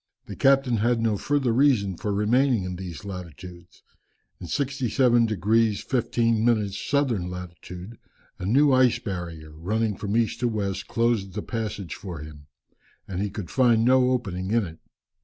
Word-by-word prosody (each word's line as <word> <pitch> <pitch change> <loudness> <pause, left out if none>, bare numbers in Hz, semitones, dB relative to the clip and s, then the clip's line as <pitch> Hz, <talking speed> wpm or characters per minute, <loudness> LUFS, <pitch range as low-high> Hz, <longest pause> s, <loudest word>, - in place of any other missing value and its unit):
The - - -8
captain 135 -3 +3
had 120 +2 +1
no 115 -2 +1
further 135 +3 0
reason 115 -8 +3
for 105 - -3
remaining 115 +3 +2
in 90 0 -4
these 90 0 -8
latitudes. 90 -2 -10 0.6
In 90 - -8
67 125 - +2
degrees 110 +1 +1
15 115 -3 +1
minutes 105 -4 +1
southern 125 -11 0
latitude 90 +3 -9 0.4
a 90 - -4
new 140 +6 +4
ice 130 -2 +4
barrier, 85 -8 -6
running 105 +6 -1
from 105 +3 -2
east 115 -2 0
to 120 - +1
west 100 -4 -3
closed 115 -5 0
the 105 - -3
passage 105 -6 -4
for 90 -4 -7
him, 75 -1 -11 0.6
and 95 -1 -3
he 105 - -1
could 100 -3 -7
find 120 -3 +3
no 130 0 +4
opening 95 -7 -2
in 115 -1 +2
it. 80 -2 -10
110 Hz, 160 wpm, -25 LUFS, 95-120 Hz, 0.6 s, new